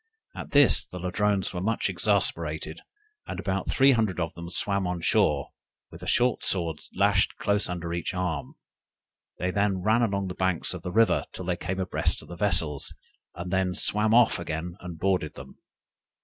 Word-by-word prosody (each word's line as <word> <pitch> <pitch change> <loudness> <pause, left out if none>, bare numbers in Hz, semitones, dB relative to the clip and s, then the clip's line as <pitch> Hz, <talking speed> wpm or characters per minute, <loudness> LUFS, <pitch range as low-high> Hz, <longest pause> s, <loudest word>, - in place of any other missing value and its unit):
At - - -7
this 145 -3 +6
the 90 - -10
Ladrones 95 +2 0
were 90 - -3
much 110 +4 0
exasperated, - - -1 0.5
and - - -5
about - - -2
three 135 0 +5
hundred 110 -8 +1
of 80 -1 -2
them 85 0 -8
swam 100 +1 0
on 90 -1 -2
shore, 70 -3 +2 0.4
with - - -12
a - - -7
short 125 0 +2
sword 85 -5 -1 0.2
lashed - - +2
close 100 -1 0
under 85 -1 -4
each 85 -1 -2
arm; 90 -5 -3 0.8
they 90 +1 -1
then 100 -2 0
ran 110 +4 +3
along 100 -4 0
the 90 - -4
banks 95 -2 0
of - - -7
the 90 - -5
river 115 +4 +3
till 90 - -6
they 90 -1 0
came 95 +2 -4
abreast 95 -1 -1
of - - -16
the 90 - -7
vessels, 80 -7 -1 0.4
and 90 +1 -6
then 95 -1 +1
swam 105 +1 +2
off 120 -4 +5
again 85 +1 -4
and 90 -2 -8
boarded 90 -3 0
them. - - -12
90 Hz, 180 wpm, -27 LUFS, 85-105 Hz, 0.8 s, this